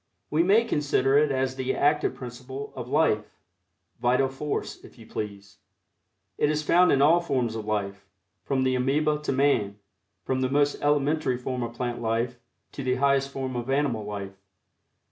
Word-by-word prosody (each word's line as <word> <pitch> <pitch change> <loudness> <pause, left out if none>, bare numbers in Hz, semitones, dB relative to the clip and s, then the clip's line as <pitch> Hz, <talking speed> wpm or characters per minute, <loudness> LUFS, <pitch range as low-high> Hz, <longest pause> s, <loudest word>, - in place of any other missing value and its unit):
We 155 +2 +3
may 205 +6 +4
consider 140 - +1
it 150 -1 +2
as 130 -1 -1
the 130 0 -1
active 150 +1 +2
principle 130 +2 -8
of 125 -2 -6
life 135 -8 +1 0.6
Vital 125 +2 +2
Force, 145 +2 -4
if - - -15
you - - -13
please. 100 -1 -7 0.8
It 145 - +3
is 155 0 0
found 180 +4 +4
in 140 0 +4
all 165 +4 +6
forms 125 -8 -1
of 110 -2 -5
life, 100 -2 -2 0.4
from 135 -2 0
the 130 0 +2
amoeba 150 +4 +1
to 150 - -2
man 130 -7 +1 0.5
from 130 0 -1
the 130 - +1
most 145 +1 +1
elementary 145 -2 +1
form 125 0 -4
of 120 0 -4
plant 120 -1 -3
life 120 +2 -1 0.3
to 140 - -6
the 130 0 +1
highest 140 +1 +2
form 135 -2 -4
of 120 +1 -4
animal 135 -5 0
life. 100 -1 -7
130 Hz, 170 wpm, -26 LUFS, 120-145 Hz, 0.8 s, all